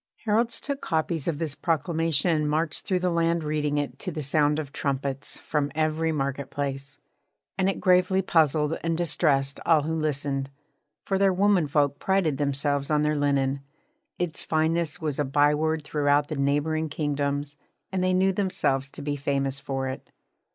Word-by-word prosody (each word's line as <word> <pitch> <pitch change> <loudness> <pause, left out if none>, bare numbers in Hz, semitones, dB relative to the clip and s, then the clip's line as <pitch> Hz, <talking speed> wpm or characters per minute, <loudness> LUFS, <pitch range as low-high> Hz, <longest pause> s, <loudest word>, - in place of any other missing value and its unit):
Heralds 230 +2 +1
took 280 -1 -4
copies 160 -1 -1
of 165 -4 0
this 155 -2 -3
proclamation 165 0 +1
and 150 -1 0
marched 155 +1 -1
through 185 -2 +1
the 180 -1 +1
land 170 0 +1
reading 150 -1 -1
it, 145 -1 -3
to 185 - -4
the 155 -2 -4
sound 150 +1 +2
of 145 -3 -5
trumpets, 135 -1 -2
from 145 -1 -2
every 155 +1 +1
market 140 -2 -2
place: 140 0 -4 0.6
and 190 0 +1
it 195 - -2
gravely 185 +1 +3
puzzled 155 -2 +2
and 165 -1 0
distressed 140 -5 +1
all 160 -3 +4
who 160 +2 -2
listened, 140 -3 -1 0.6
for 195 -1 0
their 195 -1 +4
women 190 -3 +3
folk 145 -1 +1
prided 190 -8 +1
themselves 140 0 0
on 150 -1 +2
their 150 0 +2
linen. 140 -1 +1 0.6
Its 175 -3 -3
fineness 160 +1 0
was 150 -4 -3
a - - +3
byword 150 +3 +2
throughout 145 -1 +1
the 155 - -3
neighbouring 145 +3 0
kingdoms, 145 -1 -2 0.4
and 185 -1 -1
they 185 - +2
knew 190 +1 +3
themselves 180 -9 0
to 145 - -9
be 145 0 -1
famous 140 -1 -1
for 135 -1 -3
it. 130 - -6
150 Hz, 170 wpm, -26 LUFS, 140-165 Hz, 0.6 s, all